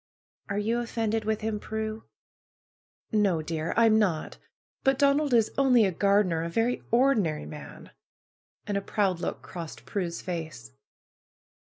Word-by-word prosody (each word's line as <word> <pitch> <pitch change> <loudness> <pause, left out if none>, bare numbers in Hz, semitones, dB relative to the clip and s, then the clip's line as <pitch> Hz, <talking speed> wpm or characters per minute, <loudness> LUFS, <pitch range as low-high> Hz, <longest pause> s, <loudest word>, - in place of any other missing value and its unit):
'^^ 200 - -2
'^Are - - 0
you 230 +3 +1
offended 225 -2 -1
with 220 0 -1
him, 215 -1 -2
Prue?" 220 +1 -4 1.1
^^No, 190 -7 +2
dear! 160 0 -2
I 230 - +6
am 220 -1 +5
not. 180 -7 -1 0.4
But 270 0 +3
Donald 280 +1 +3
is 230 -3 +3
only 250 -5 +5
a 190 - +1
gar 200 +4 +3
dener! 165 -4 -1
A 170 - -3
very 230 +7 0
ordinary 225 - +2
man!" 150 -1 -10 0.7
and 205 -2 -1
a - - -1
proud 195 -3 0
look - - -4
crossed 170 -3 -8
Prue's 175 -4 -3
face. 160 -9 -6
210 Hz, 155 wpm, -27 LUFS, 170-225 Hz, 1.1 s, I